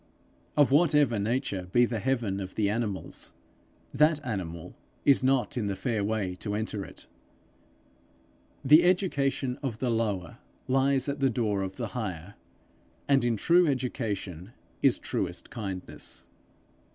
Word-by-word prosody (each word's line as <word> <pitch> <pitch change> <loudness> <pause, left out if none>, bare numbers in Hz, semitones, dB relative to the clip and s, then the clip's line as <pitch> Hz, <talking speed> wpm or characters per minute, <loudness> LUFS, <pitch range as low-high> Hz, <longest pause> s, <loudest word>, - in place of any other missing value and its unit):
Of 145 -2 +5
whatever 145 -6 +4
nature 100 -4 -1
be 120 +3 +5
the 115 -2 -3
heaven 115 -5 -1
of 95 -1 -6
the 105 -2 +1
animals, 105 -4 -4 0.6
that 150 +1 +4
animal 90 -7 -5 0.3
is 140 -1 +5
not 130 -1 +1
in 110 -4 -1
the 100 - -1
fair 110 0 -1
way 100 -3 -1
to 105 +2 -4
enter 105 -1 -3
it. - - -10 1.6
The 150 +5 +8
education 140 -8 +1
of 130 -6 -3
the 125 0 -1
lower 105 -7 -2 0.3
lies 135 0 +2
at 140 0 -2
the 135 -1 +3
door 110 -5 0
of 95 0 -4
the 115 -3 -4
higher, 95 -4 -5 0.7
and 135 -2 +4
in 120 -2 +1
true 175 - +4
education 110 - -3 0.3
is - - +4
truest - - -4
kindness. 95 -5 -6
115 Hz, 140 wpm, -28 LUFS, 100-135 Hz, 1.6 s, The